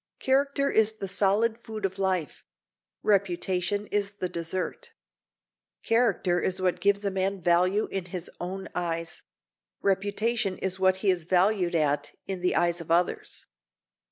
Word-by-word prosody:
Character 275 +1 +1
is 220 0 +3
the 200 -3 -6
solid 205 +4 +2
food 220 -3 -5
of 190 0 -3
life; 185 -5 -1 0.6
reputation 190 0 +1
is 205 0 0
the 190 -2 -3
dessert. 170 +1 -3 0.9
Character 205 -6 +2
is 185 - 0
what 180 -1 0
gives 200 +2 +2
a 200 - +1
man 190 +1 -1
value 180 +4 +3
in 195 -2 -3
his 180 -1 -5
own 190 +2 -5
eyes; 165 -2 -3 0.6
reputation 205 +1 0
is 190 0 -2
what 190 0 +3
he 195 - +6
is 175 -3 -2
valued 180 0 +2
at 145 -2 0
in 190 -2 -4
the 180 - +1
eyes 170 +1 +1
of 165 - -11
others. 175 +2 0
190 Hz, 145 wpm, -27 LUFS, 175-205 Hz, 0.9 s, he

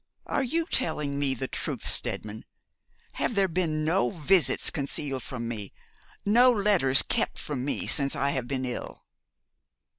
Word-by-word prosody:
Are - - -1
you 325 +6 -1
telling 150 - 0
me 135 -2 +1
the 130 - -4
truth, - - -4
Steadman? 110 +1 -1 0.8
Have 235 - 0
there 195 -1 +3
been 160 -3 -1
no 175 +5 +2
visits 175 0 +2
concealed 140 -1 -2
from 120 -2 -6
me, 105 -5 -6 0.5
no 240 +5 +6
letters 195 - +4
kept - - -1
from 140 -4 -4
me 140 - -2
since 140 -1 +2
I 140 +1 0
have 130 -4 -3
been 130 -1 -2
ill?' 125 -1 -6
145 Hz, 150 wpm, -27 LUFS, 130-190 Hz, 0.8 s, no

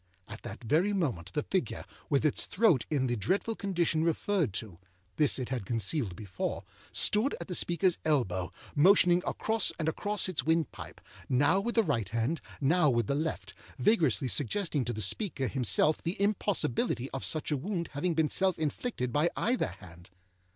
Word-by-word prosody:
At 110 +2 -9
that - - -8
very 165 - +2
moment, 120 - -2
the 150 - -1
figure, 190 -2 -2 0.2
with 145 -1 +2
its 150 - +1
throat 185 - +3
in 140 -4 +1
the 120 -1 0
dreadful 190 - -1
condition 175 -6 0
referred 170 - 0
to 95 -5 -5 0.4
(this 150 -3 +4
it 130 -2 -4
had 130 -5 -2
concealed 115 - -2
before), 100 -3 -4 0.3
stood 220 +7 +2
at - - -7
the 185 - -4
speakerâs 175 +1 +1
elbow, 95 - 0 0.3
motioning 175 +2 +5
across 220 -2 +2
and 160 - -2
across 205 +6 -1
its 185 -4 -1
windpipe, 160 -2 -2 0.3
now 145 +8 +3
with 235 +4 -2
the 225 - +4
right 115 - -1
hand, 115 - -1 0.2
now 155 +2 +3
with 120 -3 +1
the 140 - -1
left, 155 +3 -3 0.2
vigorously 145 - +2
suggesting 145 - 0
to 120 - -2
the 110 -1 -2
speaker 135 - -2
himself 130 - +2
the 170 +4 -3
impossibility 195 - 0
of 135 - -4
such 155 0 -2
a 150 - +1
wound 170 +3 -3
having 165 +4 -1
been 155 -1 +1
self 190 -2 +2
inflicted 150 - -3
by 150 +4 +3
either 245 +4 +1
hand. 85 -2 -13
155 Hz, 170 wpm, -30 LUFS, 120-185 Hz, 0.4 s, motioning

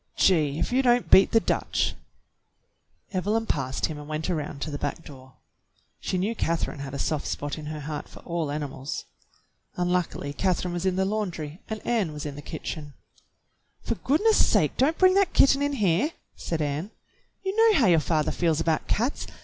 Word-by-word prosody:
"Gee! 155 -6 +3
If - - -1
you 255 +2 +3
don't 245 -2 +2
beat 190 - +8
the 225 - +4
Dutch! - - 0 0.6
" - - -44
Evelyn 210 +4 0
passed 135 -8 -1
him 155 -2 -5
and 145 - -9
went 155 +3 -2
around 150 -4 -3
to 155 - -4
the 145 - -4
back 145 +3 -4
door. 130 -3 -13 0.7
She 185 - -2
knew 200 +5 0
Catherine 165 -8 -1
had 140 0 -6
a - - -3
soft 150 +2 -1
spot 145 +2 -3
in 150 - -7
her 155 -1 -5
heart 150 +1 -5
for - - -13
all 170 -3 -2
animals. 145 -2 -4 0.7
Unluckily 180 -5 -1
Catherine 180 +1 0
was 175 +2 -1
in 185 - +1
the 190 0 +1
laun 210 0 -1
dry 155 -1 -7
and 220 -1 -5
Ann 210 -10 0
was 150 +1 -6
in 145 -2 -5
the 145 - -8
kitchen. 150 -2 -6 0.9
"For - - -1
goodness 415 - +3
sake, - - +2
don't 300 +5 +2
bring 370 0 +6
that 395 -1 +3
kitten 275 0 +5
in 285 0 +1
here!" 210 - +1 0.2
said 160 -2 -2
Ann. 150 +6 -2 0.5
"You 385 +1 -2
know 450 -2 +5
how 240 - +4
your 170 -4 +5
father 155 -1 0
feels 165 -3 +1
about 160 -1 0
cats. 240 +7 -1
170 Hz, 195 wpm, -26 LUFS, 150-220 Hz, 0.9 s, beat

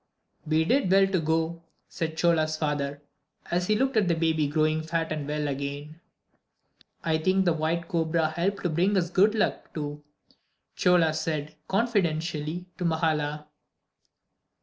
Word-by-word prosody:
"We 160 +1 +2
did 255 -1 +2
well 195 0 +6
to 190 -1 0
go," 160 +1 -1 0.3
said 160 -1 -4
Chola's 160 -2 +2
father, 145 -2 -2 0.5
as 180 +1 0
he 215 - +3
looked 265 +3 0
at 210 -4 +3
the 170 - +2
baby 160 -2 +1
growing 155 +1 +1
fat 165 0 -2
and 150 -2 -3
well 150 0 -1
again. 140 +3 -5 1.0
"I 160 -1 +1
think 190 +3 +2
the 175 - +3
white 165 +2 -1
cobra 165 -2 +1
helped 195 +5 -1
to 175 - +1
bring 185 +6 +2
us 175 -1 0
good 205 +4 +4
luck, 215 - -1
too," 150 -1 -5 0.7
Chola 175 -3 +3
said, 155 -1 -3
confidentially 175 -6 -1
to - - -2
Mahala. 155 -2 0
160 Hz, 150 wpm, -27 LUFS, 155-180 Hz, 1.0 s, well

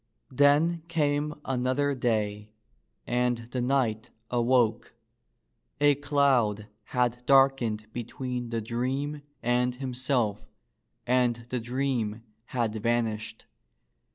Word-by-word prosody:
Then 145 +5 +4
came 150 -2 0
another 130 +2 0
day, 105 -4 -1 0.5
and 125 0 +1
the 125 - -1
knight 125 -3 0 0.2
awoke. 120 -2 +2 0.8
A 145 0 +5
cloud 135 -7 +2 0.2
had 125 -1 0
darkened 135 -6 +4
between 125 0 -4
the 115 -1 -2
dream 130 +6 -2 0.2
and 125 +1 +1
himself 125 -4 -1 0.6
and 120 -2 +1
the 125 - -1
dream 120 -3 -2 0.2
had 120 -4 -1
vanished. 115 -1 -1
125 Hz, 95 wpm, -28 LUFS, 115-135 Hz, 0.8 s, A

